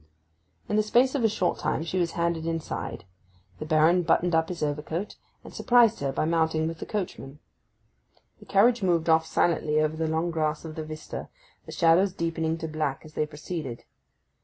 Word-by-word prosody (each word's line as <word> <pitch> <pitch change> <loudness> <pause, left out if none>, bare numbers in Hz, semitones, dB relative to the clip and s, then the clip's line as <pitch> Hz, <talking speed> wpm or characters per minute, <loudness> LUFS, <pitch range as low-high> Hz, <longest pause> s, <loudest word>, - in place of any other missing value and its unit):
In 210 - 0
the - - +5
space 245 +5 +3
of 275 -5 -1
a 225 - +4
short 185 -4 -1
minute 160 - -1
she 185 +2 -2
was 170 -2 0
handed 170 -1 -1
inside; 165 - -4 0.5
the 155 - -6
Baron 160 +3 +4
buttoned 175 +1 +1
up 160 0 +2
his 175 -3 -4
overcoat, 155 +6 -3 0.3
and - - -12
surprised 240 -2 +4
her 140 -1 -1
by 135 - -1
mounting 160 -1 +1
with 165 -1 -5
the - - -7
coachman. 175 -9 -5 1.0
The - - -16
carriage 230 +4 +4
moved 170 -3 +1
off 160 0 +4
silently 155 -3 +1
over 155 0 +1
the 160 0 -1
long 160 +2 -1
grass 155 -1 -1
of 160 - -6
the 155 - -5
vista, 155 0 -7 0.4
the - - -8
shadows 175 +3 +3
deepening 165 -2 -2
to 160 - -5
black 155 -3 -3
as 155 - -13
they 155 - -1
proceeded. 150 -4 -6
165 Hz, 185 wpm, -26 LUFS, 155-180 Hz, 1.0 s, the